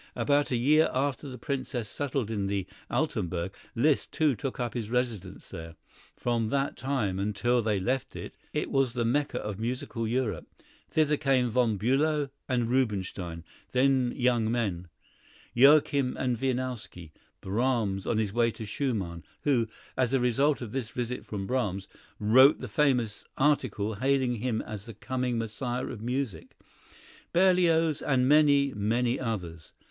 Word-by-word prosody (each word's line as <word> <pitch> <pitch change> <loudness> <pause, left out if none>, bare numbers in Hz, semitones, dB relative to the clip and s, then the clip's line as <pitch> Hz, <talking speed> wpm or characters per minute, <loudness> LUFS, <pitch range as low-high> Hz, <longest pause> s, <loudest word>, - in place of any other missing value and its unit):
About 145 0 +2
a 125 - 0
year 150 +6 +4
after 140 +1 -1
the 130 - -7
Princess 130 -2 -3
settled 135 -3 -2
in 100 -3 -1
the 100 -2 -1 0.2
Altenburg, 90 +2 -1 0.2
Liszt, 140 +5 +2
too, 150 -4 +2
took 130 +5 -5
up 120 -2 -2
his 115 -4 -4
residence 115 -7 -3
there. 80 0 -8 0.4
From 115 -2 -1
that 140 +2 0
time 120 -8 -1
until 105 +5 +1
they 105 -3 0
left 130 +7 -2
it, - - -7 0.2
it 150 - -2
was 135 -3 +2
the 120 -2 0
Mecca 140 +5 0
of 105 -1 -5
musical 120 0 -3
Europe. 120 -1 -1 0.4
Thither 150 -1 +2
came 130 -4 +2
Von 115 -3 +2
Bülow 140 +6 +1 0.2
and 120 -3 +1
Rubinstein, 95 -9 -1 0.3
then 130 -1 +3
young 120 -3 +2
men; 100 -7 -1 0.7
Joachim 140 0 +5
and 125 -2 0
Wieniawski; 125 -9 -3 0.3
Brahms, 105 -2 0
on 115 - +1
his 105 -3 0
way 120 0 +3
to 110 0 -7
Schumann, 100 -8 -2 0.2
who, 125 -6 +2 0.3
as 130 -2 +2
the 135 +1 +2
result 135 +4 +2
of 115 -4 -6
this 125 -3 -3
visit 125 0 -4
from 100 -2 -5
Brahms, 100 -5 -1 0.3
wrote 130 +7 +6
the - - -5
famous 125 -8 +1
article 130 -7 +1
hailing 130 +2 +1
him 115 0 -1
as 105 -1 -7
the 115 - -9
coming 125 +2 -2
Messiah 120 +3 -3
of 115 -4 -7
music; 120 - -3 0.8
Berlioz, 170 -4 +3
and 130 -3 +2
many, 145 -2 +5
many 115 +4 0
others. 90 -10 -5
120 Hz, 150 wpm, -28 LUFS, 110-135 Hz, 0.8 s, wrote